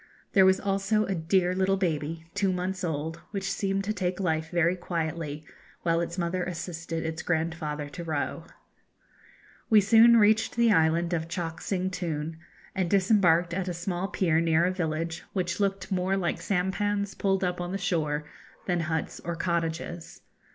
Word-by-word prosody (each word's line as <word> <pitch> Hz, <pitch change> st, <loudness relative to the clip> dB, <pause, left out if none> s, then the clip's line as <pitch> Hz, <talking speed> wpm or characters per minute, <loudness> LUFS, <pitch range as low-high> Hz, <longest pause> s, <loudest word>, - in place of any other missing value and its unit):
There 190 Hz, -1 st, +7 dB
was 190 Hz, 0 st, +4 dB
also 200 Hz, +2 st, +1 dB
a 195 Hz, -, -1 dB
dear 180 Hz, +2 st, +1 dB
little 190 Hz, +1 st, +2 dB
baby, 160 Hz, -3 st, -2 dB
two 200 Hz, -1 st, +1 dB
months 185 Hz, +1 st, -3 dB
old, 160 Hz, 0 st, -2 dB
which 195 Hz, -1 st, -3 dB
seemed 195 Hz, 0 st, -1 dB
to 210 Hz, +2 st, -1 dB
take 185 Hz, -3 st, -2 dB
life 160 Hz, -4 st, 0 dB
very 170 Hz, +1 st, +2 dB
quietly, 160 Hz, -3 st, -3 dB, 0.4 s
while 165 Hz, 0 st, +2 dB
its 170 Hz, +1 st, -4 dB
mother 180 Hz, +1 st, -1 dB
assisted 165 Hz, -2 st, -4 dB
its 160 Hz, +1 st, -3 dB
grandfather 160 Hz, -3 st, -2 dB
to 170 Hz, -, -7 dB
row. 155 Hz, -3 st, -3 dB, 1.2 s
We 220 Hz, -, +7 dB
soon 230 Hz, +3 st, +7 dB
reached 220 Hz, +1 st, +4 dB
the 235 Hz, -1 st, +4 dB
island 165 Hz, 0 st, +3 dB
of 165 Hz, -1 st, -1 dB
Chock 165 Hz, -2 st, -4 dB
Sing 185 Hz, -1 st, -1 dB
Toon, 165 Hz, -3 st, -3 dB, 0.3 s
and 190 Hz, -3 st, -1 dB
disembarked 180 Hz, -4 st, +3 dB
at 185 Hz, +1 st, -2 dB
a 180 Hz, -, -2 dB
small 175 Hz, +2 st, -2 dB
pier 165 Hz, -5 st, +1 dB
near 165 Hz, 0 st, +3 dB
a 180 Hz, -, +2 dB
village, 165 Hz, -2 st, -2 dB
which 180 Hz, -2 st, -1 dB
looked 195 Hz, -1 st, -1 dB
more 190 Hz, +1 st, +1 dB
like 175 Hz, -3 st, -1 dB
sampans 200 Hz, +1 st, 0 dB
pulled 195 Hz, -1 st, 0 dB
up 180 Hz, -1 st, -1 dB
on 175 Hz, 0 st, -4 dB
the 195 Hz, -, -1 dB
shore 155 Hz, -5 st, -1 dB, 0.4 s
than 175 Hz, -2 st, 0 dB
huts 160 Hz, -1 st, -2 dB
or 170 Hz, 0 st, -4 dB
cottages. 165 Hz, -1 st, -3 dB
175 Hz, 165 wpm, -28 LUFS, 165-195 Hz, 1.2 s, There